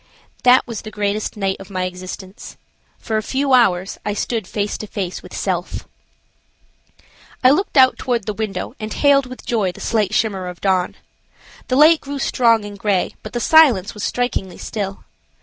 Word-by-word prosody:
That 250 0 +5
was 230 -4 -6
the 215 - -8
greatest 210 0 -2
night 195 -1 -1
of 195 0 -11
my 185 -2 -2
existence. 185 +1 -8 0.4
For 220 -1 -2
a - - 0
few 270 +4 0
hours 195 -7 +3
I 210 - -2
stood 220 -2 -2
face 205 -1 -2
to 215 - -6
face 190 -4 -4
with - - -9
"self!" - - -3 1.6
I 255 - +7
looked 365 +1 0
out 260 -1 +6
toward 240 -5 -1
the 210 - -2
window 205 -3 -4
and 215 0 -5
hailed 280 0 +3
with 255 0 -10
joy 210 -6 0
the - - -14
slight 215 -4 0
shimmer 195 -4 0
of 180 -1 -8
dawn. 185 -2 0 0.7
The 255 - 0
light 310 +3 +6
grew 285 0 -5
strong 230 -5 +2
and 205 -1 -9
gray, 200 -3 0
but 215 - -9
the 240 - -1
silence 250 - +5
was 210 - -7
strikingly 220 -7 -2
still. 195 -2 -5
215 Hz, 180 wpm, -20 LUFS, 195-250 Hz, 1.6 s, I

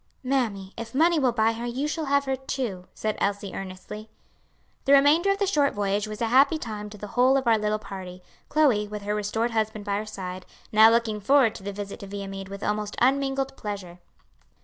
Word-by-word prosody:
"Mammy, 225 -8 -1
if 230 +2 -7
money 330 +3 +4
will 260 -3 +3
buy 225 -1 +2
her, 230 +1 -5
you 260 +5 -2
shall 315 +1 -2
have 280 0 +2
her, 265 0 0
too," 245 -8 -4
said 215 -1 -2
Elsie 200 0 -1
earnestly. 195 +3 -8 0.8
The 275 - +5
remainder 290 +7 +5
of 395 - +2
the 400 - +1
short 295 -7 +2
voyage 205 +1 0
was 215 +1 -7
a 225 - 0
happy 275 +6 +5
time 210 -7 -6
to 210 - -11
the 210 0 -8
whole 255 +3 +4
of 265 - -1
our 225 -2 +4
little 210 0 0
party, 185 -3 -9 0.3
Chloe, 260 -9 +3
with 210 0 -7
her 205 +1 -1
restored 210 +3 -1
husband 220 -2 -2
by 200 -1 0
her 215 +1 -4
side, 185 -3 -7 0.2
now 220 +1 +8
looking 225 -2 +1
forward 260 0 +4
to - - -10
the 200 +1 -4
visit 200 0 -7
to 200 - -8
Viamede 195 -1 -6
with 200 0 -7
almost 210 0 -2
unmingled 270 +1 +1
pleasure. 195 -6 -6
215 Hz, 210 wpm, -26 LUFS, 200-265 Hz, 0.8 s, now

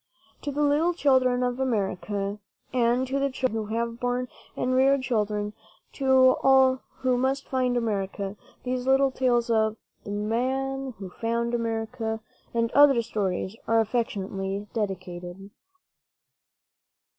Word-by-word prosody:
To 290 - -3
the 295 +2 0
little 305 +4 +2
children 255 -5 +3
of 245 0 -1
America, 205 -4 -1 0.3
and 245 +1 +2
to 270 +2 -1
the 275 0 +1
children 235 -5 -2
who 220 - -3
have 235 0 -2
borne 245 0 -1 0.3
and 255 +1 0
reared 265 +1 +4
children, 210 -4 -1 0.4
to 265 -1 +4
all 265 -1 +5 0.2
who 255 -1 +2
must 265 +2 0
find 255 -2 +1
America, 200 -3 -2 0.3
these 255 0 -2
little 270 0 +4
tales 240 -2 +1
of 220 -1 +2 0.3
"The - - -9
Man 260 +5 -1
Who 190 -2 -8
Found 235 +2 -1
America" 225 -1 -2 0.3
and 230 -1 0
other 275 -4 +6
stories 200 -3 -2
are 225 0 +4
affectionately 200 -3 -2
dedicated. 185 -2 -5
235 Hz, 130 wpm, -26 LUFS, 210-260 Hz, 0.4 s, other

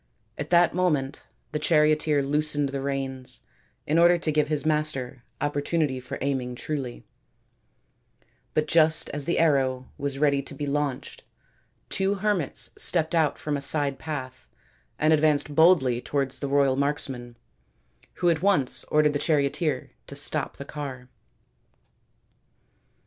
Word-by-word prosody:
At 150 - -5
that 175 -1 +4
moment 150 -7 0 0.3
the 150 - -2
charioteer 150 -1 +2
loosened 145 0 0
the 135 0 -4
reins 130 -2 -2 0.4
in 155 +3 +2
order 175 +1 +6
to 165 -2 -1
give 150 -1 +1
his 150 0 -1
master 145 -5 -1 0.2
opportunity 145 -1 -1
for 130 +3 -7
aiming 130 -3 -2
truly, 135 -2 -5 1.5
but 155 - +2
just 160 0 +4
as 145 -1 -3
the 170 - 0
arrow 135 -5 +1
was 140 -1 -2
ready 140 -1 +2
to 140 - -9
be 145 - -4
launched, 140 -2 -3 0.7
two 195 +1 0
hermits 195 -6 -1
stepped 165 -2 +1
out 160 -3 +2
from 150 -1 -3
a 140 - -3
side 140 -1 0
path 130 -5 -6 0.5
and 155 +1 +3
advanced 150 -1 +2
boldly 145 -7 +4
towards 135 -1 -2
the 140 - -3
royal 140 -1 +3
marksman, 135 -4 -2 0.8
who 175 - +1
at 160 -1 -1
once 185 -10 +2
ordered 150 -1 +2
the 145 - -1
charioteer 150 +1 0 0.2
to - - -9
stop - - -1
the 140 - -7
car. 135 -4 -7
145 Hz, 140 wpm, -26 LUFS, 135-155 Hz, 1.5 s, order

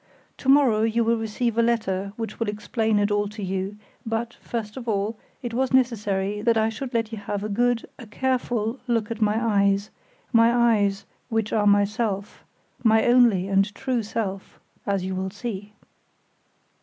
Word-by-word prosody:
To 265 - -3
morrow 270 -6 +5
you 225 +1 +2
will 230 +1 +2
receive 225 +1 -1
a - - +6
letter 200 -5 0
which 225 -1 -6
will 230 - -1
explain 220 +1 0
it 205 0 +1
all 205 0 +1
to 210 0 -7
you, 190 +2 -3 0.3
but, 225 +1 -2
first 215 -3 -5
of 245 -2 -8
all, 210 +1 0 0.3
it 240 -1 -4
was 260 +2 0
necessary 210 -5 +1
that 230 +1 +3
I 220 0 +2
should 245 +3 -6
let 225 -1 0
you 220 - -5
have 205 0 -4
a 215 - -3
good, 240 +3 +1
a 235 - -10
careful 245 0 -1
look 230 -3 0
at 230 0 -5
my 215 +1 +2
eyes, 200 -3 +2 0.4
my 230 0 +6 0.2
eyes, 200 -1 0 0.2
which 225 -2 -1
are 210 -2 +2
myself, 205 0 +1 0.4
my 220 -1 +4
only 240 -7 +4
and 195 +1 +2
true 255 -3 -1
self, 205 -3 -4 0.3
as 195 -2 0
you 190 - -3
will 190 +1 -2
see." 210 0 -6
220 Hz, 175 wpm, -24 LUFS, 205-235 Hz, 0.4 s, a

